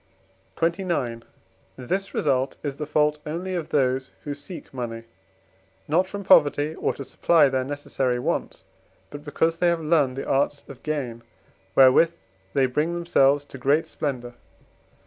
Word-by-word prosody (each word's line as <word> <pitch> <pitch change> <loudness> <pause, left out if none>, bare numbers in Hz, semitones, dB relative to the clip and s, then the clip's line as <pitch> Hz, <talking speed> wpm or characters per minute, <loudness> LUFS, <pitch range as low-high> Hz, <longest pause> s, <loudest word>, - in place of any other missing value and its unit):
XXIX. 165 -9 -1 0.6
This 190 +10 -3
result 130 +1 0
is 140 -2 -4
the 150 - -4
fault 150 0 +2
only 175 +5 -4
of 170 -4 -3
those, 130 -1 +1
who 145 - -4
seek 145 +4 -10
money, 115 -3 -5 0.8
not 175 +5 +2
from 200 +1 -6
poverty 150 -4 +4
or - - -1
to 140 - -6
supply 155 +1 +3
their 130 -1 0
necessary 135 -2 -2
wants, 120 - -3 0.5
but 145 0 -8
because 160 +2 0
they 175 - +3
have 170 -1 +2
learned 150 -5 +2
the 135 - -4
arts 140 +1 +1
of 135 - -11
gain, 130 -7 -3 0.5
wherewith 135 +6 +6 0.4
they 135 - +4
bring 150 +7 0
themselves 145 -5 +3
to 140 - -11
great 145 +5 +2
splendour. 125 -5 -4
145 Hz, 145 wpm, -24 LUFS, 130-165 Hz, 0.8 s, wherewith